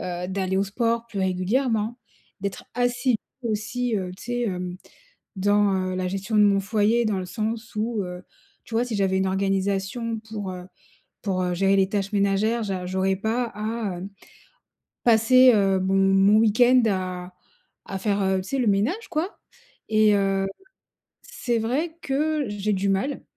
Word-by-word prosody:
Heu, 180 0 -4
d'aller 190 0 -1
au 195 - +3
sport 230 +3 -1
plus 215 -4 -6
régulièrement, 215 +5 0 0.4
d'être 200 0 -4
assidue 245 0 +1 0.3
aussi, 230 +1 -1
heu, 185 -2 -3
tu - - -13
sais, 245 0 -2
hem, 180 -4 -3 0.6
dans, 205 +1 +3 0.2
heu, - - -3
la 185 0 -1
gestion 195 +4 -3
de 210 - +6
mon 200 -1 +4
foyer 215 +3 +2
dans 210 -3 0
le 185 - -4
sens 220 +4 -4
où, 215 -1 -1
heu, 180 0 -7 0.4
tu - - -11
vois 230 +2 +2
si 245 -3 -3
j'avais 190 -1 +1
une 190 0 +1
organisation 195 +4 -1
pour, 210 -3 -6
heu 180 0 -8 0.6
pour, 190 -3 -1
heu, 180 0 -1
gérer 195 +2 +2
les 190 -1 +3
tâches 200 0 -2
ménagères, 205 +3 +1
je 200 -2 -2
j'aurais 190 +1 0
pas 225 +5 0
à, 215 -2 -3
heu, 185 - -6 1.0
passer, 245 +3 +6
heu, 195 -2 +2
mon 190 +1 +1
mon 195 +1 +5
week 220 +1 +2
end 250 +1 +6
à 185 -2 -3 0.5
à 195 - -4
faire, 200 +1 0
heu, 190 0 +1
tu 185 - -9
sais 275 - -1
le 245 -4 +2
ménage 230 - 0
quoi 345 +4 -2 0.5
et 215 -1 +5
heu, 195 -1 +1 0.8
c'est 240 -2 -2
vrai 285 +9 -1
que 300 +2 0
j'ai 205 0 -2
du 195 +1 -1
mal, 230 +9 -1
205 Hz, 170 wpm, -24 LUFS, 190-230 Hz, 1.0 s, de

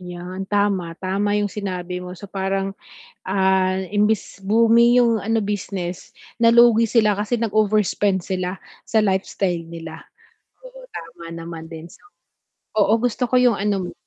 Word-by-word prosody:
'Yan 180 +2 -7
tama, 195 -5 0
tama 200 +2 -1
yung 205 -1 -1
sinabi 180 -3 -4
mo 180 0 -8
so 190 - -11
parang, 195 0 -2 0.5
ah, 190 -1 +2 0.2
imbis 210 0 0
booming 230 +4 +4
yung 230 -2 +2
ano 225 +2 0
business, 190 -3 -5 0.2
nalugi 230 0 +5
sila 215 -3 +2
kasi 210 +4 -1
nag-overspend 210 -3 +1
sila 185 0 -3 0.3
sa 220 -1 +2
lifestyle 190 -3 -1
nila. 165 -1 -9 0.6
Oo - - -13
tama 165 0 -9
naman 165 -1 -8
din 165 +1 -10
so. - - -18 0.8
Oo 210 +1 +4
gusto 245 +1 -1
ko - - +1
yung 245 -4 +4
ano 195 -3 -1
mo - - -15
195 Hz, 140 wpm, -21 LUFS, 180-215 Hz, 0.8 s, nalugi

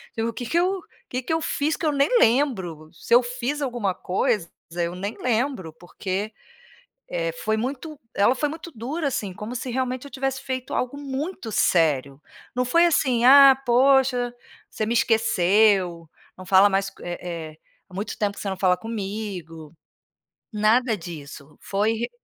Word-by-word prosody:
"E 225 - -2
o 230 +1 0
que 235 +1 -6
eu 365 +2 +2 0.3
que 255 0 -4
eu 320 - 0
fiz 305 0 0
que 325 - -2
eu - - +3
nem 280 0 +2
lembro, 190 - +1
se 235 +7 +1
eu 250 - +6
fiz 250 +4 -3
alguma 240 -8 -1
coisa 180 -1 0 0.3
eu 170 0 -2
nem 200 +4 -5
lembro", 235 - -1
porque 190 +5 -5 0.8
eh, - - -2
foi 220 - +1
muito, 275 +6 -4 0.2
ela 235 +6 +3
foi 295 - 0
muito 320 +3 -8
dura 280 +6 -3
assim, 205 -7 -3
como 220 +6 -6
se 255 +1 -5
realmente 255 +1 -2
eu - - -11
tivesse 265 0 -2
feito 260 -1 -4
algo 255 +2 -2
muito 280 -2 -5
sério. 145 -7 +1 0.3
Não 250 +1 +1
foi 335 +7 +4
assim: 255 -7 +2
"Ah 270 0 +8
poxa, 250 0 +3 0.4
você 215 - -3
me 235 - 0
esqueceu, 195 -6 +2 0.3
não 185 - -10
fala 190 +2 +6
mais 195 0 0
co - - -18
eh 175 0 -5
eh, 165 -3 -7 0.3
há - - -14
muito 205 +3 -4
tempo 205 -1 -1
você 200 - -4
não 190 - -2
fala 185 -2 +3
comigo". 195 -7 -6 0.8
Nada 220 +2 +3
disso, 150 -4 -10
foi 205 +3 0
ri 235 +2 -3
225 Hz, 165 wpm, -24 LUFS, 190-265 Hz, 0.8 s, Ah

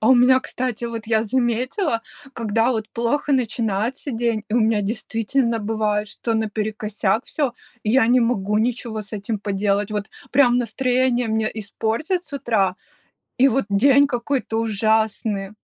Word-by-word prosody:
А 220 - +2
у 260 - +8
меня, 255 +1 +5
кстати, 245 -3 -3
вот, 230 -2 -5
я 220 -1 +2
заметила, 240 - 0 0.3
когда 230 +1 +1
вот 220 -2 -3
плохо 260 +5 0
начинается 230 +1 -1
день, 230 -2 -1
и 215 - -2
у - - +4
меня 220 -1 +2
действительно 230 +3 -1
бывает, 210 -1 -1
что 230 +2 -3
наперекосяк 215 0 -1
всё. 275 -6 -2 0.3
И 215 - +1
я 250 -2 +4
не 250 0 +5
могу 210 -3 +1
ничего 230 -1 -2
с 210 - -13
этим 210 +1 -3
поделать. 200 +1 0
Вот 210 0 -3 0.2
прям 250 -2 +5
настроение 250 -1 +1
мне 220 0 0
испортят 225 - -2
с - - -11
утра, 215 -9 +1 0.6
и 270 +2 +6
вот 270 0 +1
день 275 +8 +5
какой-то 245 -3 -1
ужасный. 220 -2 0
225 Hz, 155 wpm, -22 LUFS, 215-250 Hz, 0.6 s, у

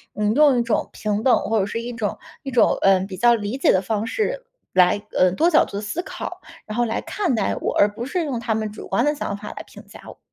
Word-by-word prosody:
嗯， 210 0 +1
用 285 -1 +5
一 - - +1
种 230 -2 -1
平 210 0 -2
等， 260 - +5
或 225 0 0
者 195 - +1
是 230 +3 -4
一 240 +1 -6
种 220 -3 -3 0.3
一 275 - -5
种， 250 - +3
呃， 195 -1 +5
比 190 0 -6
较 235 +2 +5
理 210 +3 -4
解 275 - +4
的 185 - +3
方 215 +2 -2
式 - - -2 0.3
来， 185 +2 +4 0.2
呃， 185 0 +4
多 330 - +3
角 315 - +5
度 - - -14
的 - - -3
思 215 +11 -3
考， - - -7 0.2
然 215 - -6
后 240 - +2
来 225 - -2
看 360 - -1
待 210 - 0
我， - - -3
而 205 - +6
不 225 +3 -6
是 335 +5 -2
用 265 -5 -3
他 230 -1 -1
们 215 -1 -3
主 210 - -10
观 240 - +1
的 295 - +2
想 200 -8 -4
法 210 - -8
来 - - -7
评 - - -13
价 - - -13
我。 - - -11
225 Hz, 290 characters per minute, -22 LUFS, 205-265 Hz, 0.3 s, 而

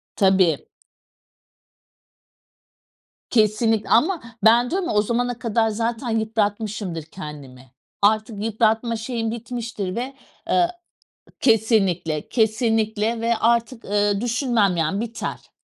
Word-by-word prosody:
Tabii. 190 -6 +3 2.6
Kesinlikle. 220 -1 +2
Ama 320 +9 +3 0.2
ben 235 +2 +5
diyorum 370 -1 -1
ya - - -1
o 210 - +4
zamana 240 +2 -1
kadar 225 -1 +1
zaten 230 +3 -2
yıpratmışımdır, 210 -5 -2
kendimi. 140 -7 -10 0.3
Artık 215 0 +1
yıpratma 225 +1 +1
şeyim 225 0 -3
bitmiştir 230 -5 -5
ve 255 +3 -4 0.4
eee 350 -1 +4 0.7
kesinlikle, 195 - +2
kesinlikle 220 0 +1
ve 230 0 +1
artık, 235 +1 +1
ııı, 205 0 +1
düşünmem 235 -6 +1
yani 165 +6 0
biter. 230 0 -6
220 Hz, 100 wpm, -22 LUFS, 205-235 Hz, 2.6 s, ben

